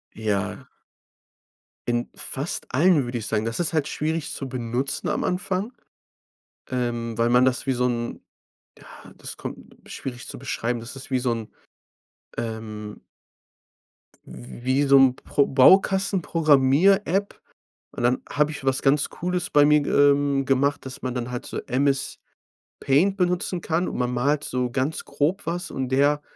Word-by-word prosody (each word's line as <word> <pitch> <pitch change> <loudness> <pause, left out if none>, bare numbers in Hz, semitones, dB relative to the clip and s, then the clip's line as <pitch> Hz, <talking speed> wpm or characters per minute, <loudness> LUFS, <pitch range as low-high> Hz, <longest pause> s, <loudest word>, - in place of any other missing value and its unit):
Ja. 105 -3 -2 1.2
In 120 0 -1
fast 140 +5 -4
allen, 155 -1 +4
würde 120 0 -4
ich 110 - -5
sagen. 110 0 0
Das 115 0 -3
ist 175 -1 -1
halt 155 -3 +1
schwierig 155 0 -2
zu 135 - -5
benutzen 125 +1 -3
am - - -1
Anfang, 190 +5 -2 1.0
ähm, 120 -3 -2
weil 115 0 +2
man 125 +1 +5
das 130 -1 0
wie 135 - +1
so 125 0 0
'n 120 -1 -3 0.6
ja, - - -17 0.3
das - - -8
kommt - - -9
schwierig 125 -2 -7
zu - - -7
beschreiben, 120 -2 -2
das 120 +4 -9
ist 135 0 -10
wie 130 - +2
so 125 -1 0
'n, 115 -2 -5 0.8
ähm 110 -2 -6 1.3
w 65 - -11
wie 130 +3 +2
so 140 0 +7
'n 135 -2 +5
Pro 140 +1 0
Baukasten-Programmier-App. 185 +2 +3 0.6
Und - - -6
dann 125 +1 +2
habe 150 +1 +1
ich 145 -3 -7
was 135 -1 +1
ganz 140 +2 +3
Cooles 180 0 -3
bei 145 -1 +5
mir, 150 0 +5
g 140 - -3
ähm, 140 -1 +3
gemacht, 140 +2 +1
dass 130 -1 -8
man 130 -1 -3
dann 125 -1 -3
halt 125 - -5
so - - -4
MS-Paint 135 +1 -2 0.8
benutzen 180 0 0
kann 170 +2 -1
und - - -5
man 125 0 0
malt 140 +4 +1
so 125 -1 -1
ganz 135 +5 -1
grob 150 +7 -1
was 175 +2 -3
und 130 -1 -3
der 145 +3 +2
135 Hz, 155 wpm, -24 LUFS, 120-150 Hz, 1.3 s, so